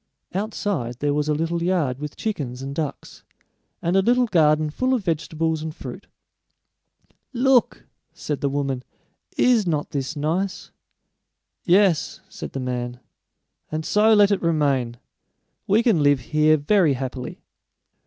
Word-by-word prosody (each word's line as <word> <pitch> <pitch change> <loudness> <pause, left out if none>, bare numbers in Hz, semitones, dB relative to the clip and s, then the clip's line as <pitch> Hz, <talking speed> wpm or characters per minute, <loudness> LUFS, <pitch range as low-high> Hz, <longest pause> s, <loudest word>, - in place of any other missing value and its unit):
Outside 195 - -2
there 145 +2 0
was 150 +1 0
a - - +3
little 165 +2 -1
yard 165 -8 0
with 150 0 -6
chickens 135 - -4
and 135 +1 -5
ducks, 145 -2 -5 0.6
and 170 +2 +1
a 195 - +5
little 245 +4 +3
garden 155 -6 +3
full 255 +10 +1
of 235 - -3
vegetables 160 -1 -1
and 160 0 -5
fruit. - - -9 1.3
"Look!" 250 0 +2 0.3
said 150 -2 -5
the 140 - +1
woman, 135 -2 -2 0.5
"is 235 -6 +3
not 150 -3 -1
this 140 +2 -3
nice?" 170 +6 -2 0.9
"Yes," 185 -3 +3
said - - -8
the 135 - -3
man; 125 -1 -4 0.7
"and 155 0 -3
so 215 +1 +3
let 205 -1 +5
it 200 - +1
remain. 140 -7 +1 0.7
We 215 +4 +3
can 215 -10 +3
live 145 -1 +4
here 155 0 +4
very 160 0 +3
happily." 130 -1 -5
155 Hz, 140 wpm, -23 LUFS, 140-195 Hz, 1.3 s, a